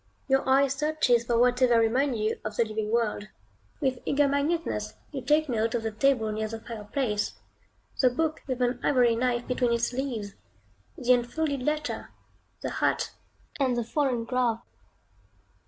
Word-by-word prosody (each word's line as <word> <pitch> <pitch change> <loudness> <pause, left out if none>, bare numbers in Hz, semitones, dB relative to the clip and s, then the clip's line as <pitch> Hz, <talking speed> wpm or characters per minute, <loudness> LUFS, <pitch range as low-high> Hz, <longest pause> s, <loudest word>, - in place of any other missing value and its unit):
Your 270 -1 +2
eye 270 +1 +5
searches 275 -4 +1
for 235 -1 +1
whatever 250 0 +4
may - - +5
remind 250 +3 +1
you 215 0 -1
of 215 -1 -5
the 235 - +2
living 215 -1 -3
world. 220 -2 0 0.5
With 260 -2 0
eager 285 0 +2
minuteness, 295 +5 -1 0.2
you 275 -3 -4
take 300 +4 +2
note 230 -2 0
of 230 - -1
the 220 - -2
table 225 -1 +2
near 215 0 -2
the 225 +1 -6
fireplace, 215 0 -2 0.7
the 255 - +6
book 310 +5 -1
with 255 -2 -1
an 245 0 0
ivory 245 -4 +3
knife 240 0 0
between 250 -1 +1
its 235 +1 0
leaves, 240 -6 -3 0.6
the 250 -4 +4
unfolded 275 +3 -1
letter, 300 +2 -2 0.5
the - - -3
hat, - - 0 0.5
and 255 -3 +1
the 240 - 0
fallen 245 -1 0
glove. 240 -2 0
245 Hz, 160 wpm, -27 LUFS, 230-275 Hz, 0.7 s, the